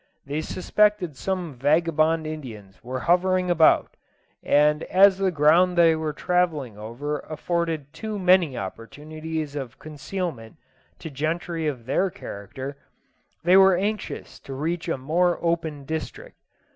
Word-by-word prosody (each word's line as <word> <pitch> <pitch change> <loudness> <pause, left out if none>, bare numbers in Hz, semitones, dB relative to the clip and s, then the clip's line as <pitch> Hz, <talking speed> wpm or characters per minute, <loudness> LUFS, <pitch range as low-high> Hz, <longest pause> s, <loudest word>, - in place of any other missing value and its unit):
They 145 +2 -3
suspected 190 -1 +1
some 180 -1 -3
vagabond 155 +4 +2
Indians 120 -11 -8
were 130 +1 -4
hovering 180 +2 +2
about, 165 -2 +3 0.4
and 150 +1 +3
as 195 +1 +5
the 195 -1 +2
ground 170 +3 +4
they 165 -1 +6
were 155 -1 -2
travelling 155 - -1
over 120 +8 -5
afforded 160 -2 -3
too 215 -1 -5
many 180 -8 +3
opportunities 150 +9 -6
of 135 -3 -6
concealment 155 -5 -6 0.4
to 160 - -8
gentry 160 +3 -2
of 125 -6 -4
their 180 +9 +1
character, 130 - -8 0.7
they 175 +2 +5
were 190 -1 +7
anxious 210 +2 -4
to 135 - -8
reach 165 +4 -3
a 165 - 0
more 170 +6 +1
open 160 -4 -2
district. 160 - -6
160 Hz, 130 wpm, -24 LUFS, 145-180 Hz, 0.7 s, were